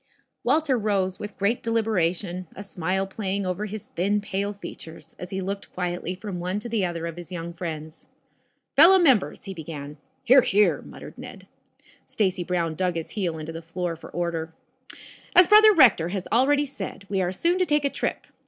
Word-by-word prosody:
Walter 280 -1 +2
rose 195 -3 0
with 205 -1 -7
great 205 +5 0
deliberation, 185 -5 0
a 200 - -7
smile 190 0 -2
playing 195 0 -3
over 185 +3 -2
his 215 0 -7
thin, 200 +4 0
pale 200 0 -2
features, 165 -5 -11
as 180 - -7
he 190 -1 -3
looked 200 +1 -5
quietly 180 0 -3
from 190 -1 -6
one 180 +3 -2
to 210 - -5
the 225 -4 0
other 170 -2 -2
of 170 0 -6
his 175 0 -10
young 170 -1 -5
friends. 160 -2 -7 0.7
"Fellow 340 +7 +9
members," 270 - +3
he 195 - -6
began. 150 -3 -8 0.3
"Hear, 260 +2 +7
hear!" 210 -2 +2
muttered - - -12
Ned. - - -10 0.6
Stacy 190 -4 0
Brown 170 -2 -1
dug 180 +1 -1
his 165 -1 -5
heel 175 -6 -2
into 155 +1 -6
the 165 0 -7
floor 170 +1 -4
for 165 - -12
order. 165 -2 -3 0.8
"As 360 - +9
brother 430 +2 +8
Rector 235 - +5 0.2
already 285 +5 +3
has 275 - -10
said, 195 0 -7
we 195 -1 -1
are 180 -1 0
soon 340 - 0
to 365 - +3
take 295 -1 +2
a - - +2
trip. - - -3
190 Hz, 185 wpm, -25 LUFS, 170-215 Hz, 0.8 s, Fellow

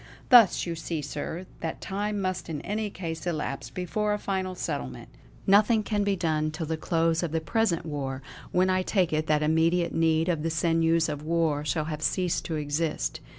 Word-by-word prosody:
Thus 240 -7 +7
you 170 - -2
see, 160 -1 -4
sir, 150 +5 -5
that 165 - -4
time 205 +1 -2
must 185 -2 -2
in 155 -3 -3
any 210 +3 -2
case 165 -3 -5
elapse 140 -7 -3
before 195 - -1
a - - 0
final 190 -2 -2
settlement. 65 - -4 0.4
Nothing 210 +3 +5
can 205 -1 0
be 200 -1 +1
done 155 -3 0
till 155 +1 -4
the 160 +1 -1
close 165 0 +1
of 170 -3 -2
the 165 - +1
present 170 +1 0
war, 135 -3 -4 0.3
when 185 +1 +3
I 185 0 +2
take 185 -3 +1
it 155 +1 0
that 150 0 +2
immediate 165 +3 +2
need 160 0 +2
of 170 -4 0
the 165 - -1
sinews 165 0 +2
of 150 -2 -4
war 160 -2 +1
shall 150 +2 -1
have 155 -1 -4
ceased 180 +1 0
to 165 - -2
exist. 150 +2 -1
165 Hz, 195 wpm, -27 LUFS, 155-185 Hz, 0.4 s, Thus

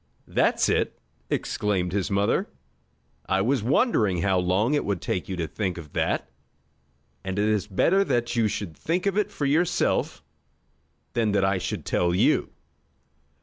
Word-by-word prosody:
"That's - - +2
it!" - - 0 0.3
exclaimed 95 -4 -1
his 100 0 -1
mother. 100 -5 +1 0.8
"I 95 0 +2
was 125 +4 +1
wondering 110 - +2
how 95 -2 +2
long 95 +9 +1
it 145 - +1
would 100 -3 -1
take 90 +3 -3
you 95 - -2
to 85 -2 -2
think 95 +1 -3
of 75 -4 -10
that. 65 - 0 1.0
And 95 0 -4
it 105 +1 +2
is 105 -2 0
better 170 - +3
that 120 -5 0
you 115 -2 +3
should 95 -5 -4
think 175 +3 -2
of 200 -1 +1
it 210 -1 +1
for 145 - -3
yourself 160 +5 +1 0.9
than 110 -3 +1
that 100 -2 +3
I 95 -1 +1
should - - -4
tell 85 0 +1
you. - - +2
100 Hz, 160 wpm, -25 LUFS, 95-120 Hz, 1.0 s, better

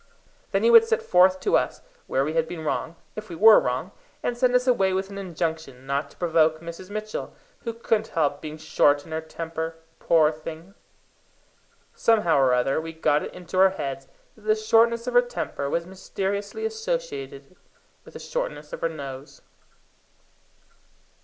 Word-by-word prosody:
Then - - 0
he 470 - +5
would 460 -1 +9
set 455 0 0
forth 185 - +4
to - - +2
us - - 0 0.2
where 135 - +1
we 155 - -3
had 160 0 +1
been 165 -1 -7
wrong, 160 +2 -2 0.2
if 215 -1 -8
we 170 - -6
were 220 +5 +8
wrong, 125 +9 -2 0.3
and 245 - -1
send 250 0 +2
us 250 0 +3
away 195 -7 +2
with 190 +1 -2
an 200 - -6
injunction 160 -7 -4
not 140 +1 -2
to - - -21
provoke 160 -2 +2
Mrs. 170 +3 -9
Mitchell, 215 +1 -5 0.3
who 230 - -1
couldn't 225 -1 0
help 145 -3 0
being 155 0 -7
short 145 -2 +2
in - - -13
her 160 0 -2
temper, 160 0 -5 0.2
poor 160 -2 +4
thing! 160 +4 -9 1.2
Somehow 210 -10 +3
or 130 -2 +4
other 125 +4 +1
we 165 0 -7
got 150 -2 +1
it - - -6
into 180 +1 -5
our 190 0 +7
heads 135 -7 -5 0.3
that 220 - -21
the 215 - +4
shortness 230 +2 +3
of 250 - -3
her 245 - +7
temper 240 -12 -4
was 170 +3 -1
mysteriously 200 - -4
associated 445 -2 -4 0.5
with - - -16
the - - -7
shortness - - -5
of - - -6
her 165 - +1
nose. 140 -3 -9
175 Hz, 175 wpm, -25 LUFS, 155-225 Hz, 1.2 s, would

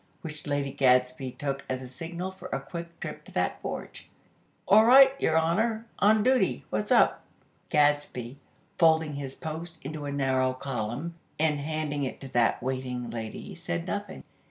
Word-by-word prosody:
which 150 -2 -7
Lady 145 -1 -1
Gadsby 125 -1 +2
took 135 -1 -3
as 130 0 -2
a - - -7
signal 170 +8 -5
for 190 - -10
a 135 - -2
quick 170 +4 -8
trip - - -6
to - - -15
that - - -1
porch. - - -6 0.6
"All 215 +2 +7
right, 265 +3 +8
Your 160 - +3
Honor! 220 +8 +1
On 215 +1 +5
duty! 255 +1 +2
What's - - -2
up?" - - +5 0.5
Gadsby, 145 -4 +1 0.4
folding 160 -2 +4
his 140 -2 -5
"Post" 160 +2 -6
into 150 +1 -5
a 140 - -3
narrow 130 -2 +1
column, 130 +4 -4 0.2
and 150 -1 +1
handing 150 -1 -2
it 130 - -4
to 135 - -7
that 120 -1 +2
waiting 125 -2 -3
lady, 110 -2 -6
said 85 0 -4
nothing. - - -4
145 Hz, 160 wpm, -28 LUFS, 130-165 Hz, 0.6 s, right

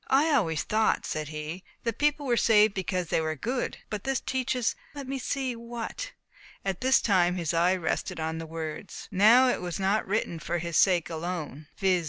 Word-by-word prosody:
"I 290 +4 +4
always 165 - +1
thought," 220 +1 +1
said 155 -1 -3
he, 155 +4 -6 0.2
"that 230 -1 -2
people 295 0 +2
were 245 -3 +2
saved 215 -2 +5
because 185 -2 -2
they - - +2
were 155 0 -1
good. 245 - -2
But 210 -2 -3
this 270 0 0
teaches, 255 -2 -1 0.2
let 280 -2 -6
me 270 0 -3
see 260 -1 -2
what," 235 - -6 0.5
at 195 -2 -2
this 260 +1 +5
time 180 -4 +3
his 170 -3 -1
eye 175 +3 +3
rested 170 -2 -2
on 160 0 -2
the 165 - -6
words, 160 +5 -6
"Now 220 +7 +6
it - - 0
was 180 +1 -4
not 195 +3 +1
written 195 -4 -1
for 175 - -2
his 170 -1 -4
sake 175 -3 +4
alone 160 -3 -5
(viz. 190 -2 +3
195 Hz, 195 wpm, -28 LUFS, 165-240 Hz, 0.5 s, Now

